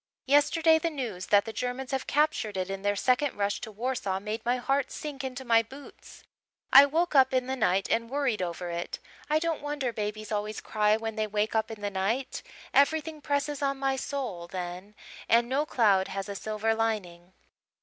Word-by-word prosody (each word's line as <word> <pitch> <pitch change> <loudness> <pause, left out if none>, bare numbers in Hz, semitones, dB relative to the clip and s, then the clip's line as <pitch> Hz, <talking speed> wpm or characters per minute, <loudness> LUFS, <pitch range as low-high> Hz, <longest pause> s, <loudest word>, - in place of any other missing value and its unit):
Yesterday 320 +4 +4
the 335 - 0
news 240 - -5
that 205 -1 +4
the 225 - -6
Germans 250 +4 -3
have 270 -1 -2
captured 290 -9 +1
it 185 +1 -2
in 195 0 -4
their 205 0 +1
second 255 +6 +1
rush 200 0 -1
to 220 - -6
Warsaw 215 -4 -2
made 215 +3 -5
my 245 +1 +1
heart 270 +2 0
sink 285 -3 -6
into 260 0 -5
my 230 -1 +5
boots. 270 +5 -13 0.5
I 280 +1 +10
woke 330 +4 0
up 265 -2 +5
in 255 -1 +2
the 260 +1 -2
night 195 -5 +1
and 230 0 +1
worried 265 -6 0
over 175 0 -4
it. 170 +1 -4 0.3
I 305 - +3
don't 325 0 -1
wonder 290 -4 -2
babies 215 0 -4
always 210 0 -2
cry 210 0 +2
when 225 0 -5
they 215 0 0
wake 210 +1 -1
up 220 -1 0
in 220 -2 -8
the 205 0 -2
night. 210 +8 -1 0.3
Everything 310 +2 +2
presses 285 0 -1
on 275 -1 0
my 270 0 0
soul 255 -11 -4
then 180 +3 -6 0.3
and 235 +1 +4
no 280 +4 0
cloud 200 -8 +3
has 195 0 -4
a 200 - -4
silver 215 +2 -1
lining." 190 -6 -3
230 Hz, 195 wpm, -28 LUFS, 205-275 Hz, 0.5 s, I